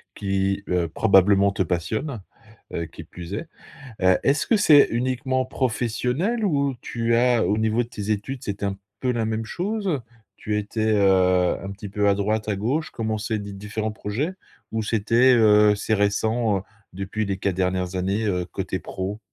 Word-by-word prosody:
qui, 100 0 -1
heu, 90 -2 +1
probablement 100 +1 +4
te 95 - 0
passionnent, 105 - -2 0.5
heu, 85 - -2
qui 85 0 -11
plus 90 +3 -9
est. 150 +10 -4 0.6
Heu, 95 0 +5
est-ce 140 +2 +2
que 225 - +3
c'est 155 -9 +6
uniquement 130 +2 0
professionnel? 130 - -1
Ou 140 -7 +1
tu 115 0 -1
as 120 -1 +3
au 105 - +1
niveau 110 +2 +1
de 115 - -9
tes 105 -2 -5
études 120 +5 -2
c'est 100 0 -5
un 100 -1 -1 0.2
peu 125 -1 +1
la 115 -2 -1
même 110 0 -2
chose, 200 - -3
heu? 145 -7 0 0.4
Tu 105 0 -2
étais, 110 +1 -1
heu, 95 -3 +3
un 95 - -5
petit 100 +1 -8
peu 105 0 +1
à 100 - +4
droite, 105 +2 -1
à 100 - 0
gauche, 130 +10 -1
commencer 110 -1 -2
des 100 -1 -7
différents 105 +2 -4
projets? 120 - -3 0.4
Ou 110 0 -1
c'était, 115 +4 +3
heu, 105 -2 +5
c'est 110 +2 0
récent, 105 +1 +1
heu, - - -7 0.3
depuis 100 +3 -3
les 100 -1 -2
4 95 -1 -1
dernières 90 0 -1
années, 100 +4 -1
heu, 90 -3 0
côté - - -4
pro? 95 +3 -5
105 Hz, 180 wpm, -24 LUFS, 100-120 Hz, 0.6 s, c'est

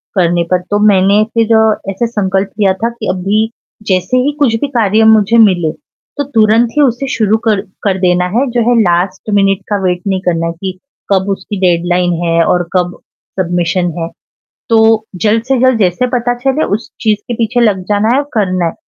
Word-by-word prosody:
करने 175 -2 +1
पर। 180 0 +2
तो 205 - +1
मैंने 200 +1 +3
फ़िर 230 -1 +1 0.4
ऐसे 230 +5 -2
संकल्प 195 -3 -1
लिया 195 -2 +3
था 225 +5 -2
कि 230 -2 -7
अभी, 205 +4 0 0.4
जैसे 185 +6 +1
ही 290 - +1
कुछ 245 -6 +2
भी 290 - 0
कार्य 220 -4 +1
मुझे 220 +2 +3
मिले, 180 -8 +3
तो 290 -1 -10
तुरंत 225 -3 +2
ही - - +4
उसे 265 0 +1
शुरू 220 -1 +2
कर 210 -3 +2 0.2
कर 195 -2 0
देना 180 -1 +2
है, 270 - +2
जो 240 0 0
है 240 -1 +3
लास्ट 185 +2 -1
मिनट 195 -1 +2
का 205 - 0
वेट 180 -1 0
नहीं 190 -1 -1
करना 165 -1 0
है 165 - -3
कि 185 -1 -4 0.4
कब 190 +1 0
उसकी 200 +1 -4
डेडलाइन 175 0 +1
है 165 0 +2
और 180 0 +1
कब 180 -1 0 0.4
सबमिशन 175 0 0
है, 165 0 -3 0.6
तो 220 -1 +3 0.2
जल्द 220 +1 +2
से 265 +1 0
जल्द 260 -2 +3
जैसे 190 +4 +1
पता 245 0 0
चले 270 +4 0
उस 220 +3 -6
चीज़ 215 -2 +1
के 240 - -2
पीछे 230 +2 -1
लग 205 -5 +2
जाना 205 +1 +1
है - - +2
और 290 0 -3
करना 185 -4 0
है। 165 - -2
205 Hz, 195 wpm, -13 LUFS, 185-230 Hz, 0.6 s, ही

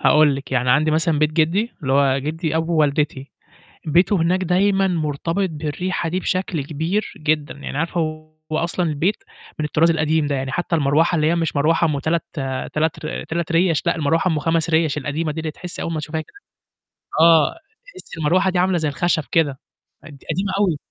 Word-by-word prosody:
هاقول 150 -2 +5
لِك، 135 0 -8
يعني 125 -1 +1
عندي 155 +4 +3
مثلًا 160 0 +1
بيت 155 0 +2
جدّي 170 +9 +1
اللي 130 - -1
هو 135 -1 +3
جدّي 160 +3 -2
أبو 165 0 +1
والدتي، 145 -2 0 0.6
بيته 175 +6 +3
هناك 180 +3 +1
دايمًا 195 +2 +2
مرتبط 165 +2 -1
بالريحة 165 +3 -3
دي 180 +3 -1
بشكل 185 -5 -2
كبير 160 +8 -2
جدًا، 150 0 -1
يعني 140 -1 -7
عارفة 165 +3 -1 0.5
هو 155 - +1
أصلًا 170 +1 -1
البيت 165 +7 0 0.4
من 155 - 0
الطراز 160 +2 +3
القديم 155 -1 +1
ده، 145 - -1
يعني 130 0 -3
حتى 175 +2 -1
المروحة 155 +3 +2
اللي 155 -2 +2
هي 165 - +2
مش 165 -3 -1
مروحة 165 +4 +3
أُم 145 -3 -1
3- 160 +4 0 0.5
3 155 +1 -1
ر - - -4
3 170 +1 -3
رِيَش 165 -2 +2
لأ، - - +2
المروحة 160 +3 +1
أُم 155 - 0
5 165 +2 0
رِيَش 160 -2 +2
القديمة 150 +3 -2
دي 155 - -5
اللي 155 -1 -3
تحسّي 180 +3 -7
أول 165 - -3
ما 155 - -2
تشوفيها 155 +1 -4
كده 155 - -17 0.8
آه، 165 -2 +6 0.3
تحسّي 375 - -12
المروحة 175 +5 +2
دي 180 -1 0
عاملة 185 0 +2
زي 155 -3 0
الخشب 170 +2 0
كده 145 -5 +1 0.4
قد - - -12 0.2
قديمة 190 +5 -1
أوي. 185 -7 +2
160 Hz, 190 wpm, -21 LUFS, 150-170 Hz, 0.8 s, آه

